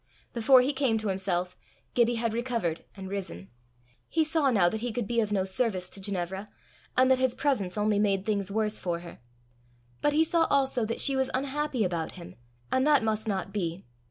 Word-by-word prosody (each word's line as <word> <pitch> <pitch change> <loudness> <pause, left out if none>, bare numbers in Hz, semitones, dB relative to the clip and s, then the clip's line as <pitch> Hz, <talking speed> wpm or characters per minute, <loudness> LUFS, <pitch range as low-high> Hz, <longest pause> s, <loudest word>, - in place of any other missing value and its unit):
Before 250 +2 +6
he 270 +3 0
came 265 -5 +1
to 215 -1 -2
himself, 185 -2 -1 0.4
Gibbie 240 0 +3
had 230 -1 -1
recovered 230 -9 -2
and 190 -1 -7
risen. 185 - -6 0.6
He 320 - +2
saw 310 -2 +2
now 200 -8 +4
that 220 +5 -1
he 240 +1 -3
could 235 0 -2
be 235 +1 0
of 215 -2 0
no 195 -2 +1
service 190 -1 -1
to 195 - -8
Ginevra, 190 0 -3 0.5
and 255 +1 +5
that 260 - +4
his 260 -1 +1
presence 235 -11 0
only 210 0 +2
made 195 -2 +1
things 205 -3 -1
worse 215 0 0
for 170 -2 -2
her. 170 -1 -11 0.8
But 295 - +2
he 310 +2 +4
saw 325 0 +2
also 265 -4 +2
that 230 - -2
she 275 - +4
was 265 -1 +1
unhappy 275 -2 -1
about 170 -3 -2
him, 175 -2 -10 0.4
and 260 +2 +2
that 290 -5 +5
must 220 0 -1
not 195 -1 -2
be. 175 -3 -3
220 Hz, 200 wpm, -28 LUFS, 190-260 Hz, 0.8 s, Before